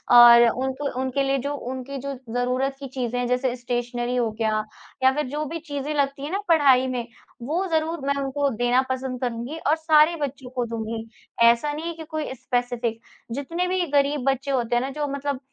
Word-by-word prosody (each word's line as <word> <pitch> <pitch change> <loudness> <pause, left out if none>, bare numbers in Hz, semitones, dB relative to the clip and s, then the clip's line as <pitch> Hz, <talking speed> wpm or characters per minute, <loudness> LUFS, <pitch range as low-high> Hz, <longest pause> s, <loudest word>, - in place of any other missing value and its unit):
और 240 0 +10
उनको 265 +3 -2
उनके 265 +1 0
लिए 275 0 +1
जो 285 +3 -3 0.2
उनकी 260 +1 -5
जो 280 +1 -4 0.2
ज़रूरत 255 +2 0
की 275 - -6
चीज़ें 245 -2 -3
हैं, 245 - 0
जैसे 250 0 0
स्टेशनरी 245 0 -2
हो 235 -2 +1
गया 215 -1 0 0.4
या 260 - +7
फिर 300 -3 -1
जो 300 +2 -2
भी 330 +3 -5
चीज़ें 290 -1 -4
लगती 280 -1 0
हैं 300 - -4
ना 395 - 0
पढ़ाई 275 -6 +5
में, 245 -2 -3 0.3
वो 325 +10 -1
ज़रूर 320 +1 0
मैं 280 - +3
उनको 270 +2 -3
वो 280 - +4
देना 245 +1 +3
पसंद 260 -1 -3
करूँगी 245 +5 -3
और 310 - +5
सारे 315 +1 +4
बच्चों 270 -2 -4
को 250 -2 -2
दूँगी, 225 0 -4 0.4
ऐसा 235 +6 +3
नहीं 310 +3 -5
है 340 - -3
कि 320 0 -9
कोई 310 -4 -3
स्पेसिफिक। 245 -2 -2 0.3
जितने 335 +8 -2
भी 365 -1 +1
ग़रीब 285 -1 +2
बच्चे 270 +1 -3
होते 240 -2 0
हैं 240 - +3
ना 265 - -2
जो 295 +1 -3
मतलब 280 -1 -2
265 Hz, 205 wpm, -24 LUFS, 245-290 Hz, 0.4 s, और